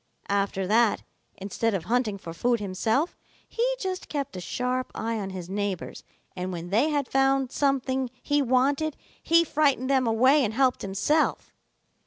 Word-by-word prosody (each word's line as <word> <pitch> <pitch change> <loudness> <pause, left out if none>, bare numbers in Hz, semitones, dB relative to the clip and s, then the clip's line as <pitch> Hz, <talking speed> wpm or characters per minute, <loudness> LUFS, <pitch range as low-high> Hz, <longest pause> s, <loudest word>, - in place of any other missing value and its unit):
"After 200 -1 0
that, 220 +2 +3 0.3
instead 205 +3 -1
of 180 - -2
hunting 225 0 0
for 170 -4 -8
food 240 +7 +1
himself, 220 - 0 0.3
he - - 0
just 375 -4 -4
kept 280 -6 -3
a 180 - -5
sharp 250 +6 -2
eye 225 0 -2
on 195 -2 -4
his 185 -2 -7
neighbors, 200 -1 -4 0.3
and 185 0 -4
when 175 0 -6
they 235 +10 +3
had 290 -3 0
found 270 -1 +2
something 265 -2 0
he 290 0 +2
wanted, 275 +4 +1 0.2
he 335 +1 +4
frightened 280 -4 +1
them 260 -3 +3
away 255 +6 +4
and 220 -2 -2
helped 260 -1 +2
himself. 200 +11 0
250 Hz, 160 wpm, -26 LUFS, 200-275 Hz, 0.3 s, he